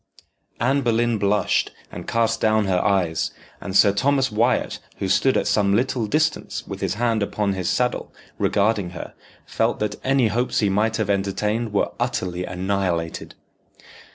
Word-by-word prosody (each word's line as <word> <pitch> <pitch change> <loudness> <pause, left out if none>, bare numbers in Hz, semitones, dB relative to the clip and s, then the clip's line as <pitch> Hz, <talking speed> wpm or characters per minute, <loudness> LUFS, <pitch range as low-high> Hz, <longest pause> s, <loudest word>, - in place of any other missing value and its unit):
Anne 135 +4 +2
Boleyn 120 -2 +1
blushed, 100 +1 +1 0.2
and - - -8
cast 115 -1 +1
down 110 -1 +3
her 90 -2 +1
eyes, 90 -4 +1 0.3
and 95 -1 0
Sir 100 - +6
Thomas 135 +3 +1
Wyat, 115 +4 +1 0.2
who 95 - -2
stood 130 +7 +3
at - - 0
some 100 -2 +2
little 120 -1 0
distance 155 +6 -1
with - - -7
his - - -1
hand 115 -1 +1
upon 100 0 -1
his 95 -2 -2
saddle, 125 0 -1 0.3
regarding 100 -2 +1
her, - - -7 0.3
felt - - 0
that 105 -1 -4
any 130 -3 +3
hopes 120 +4 0
he 105 - +2
might 110 +3 +1
have 105 -3 0
entertained 105 +3 -1
were 100 - 0
utterly 90 0 -2
annihilated. 90 -2 -2
105 Hz, 155 wpm, -22 LUFS, 100-120 Hz, 0.3 s, Sir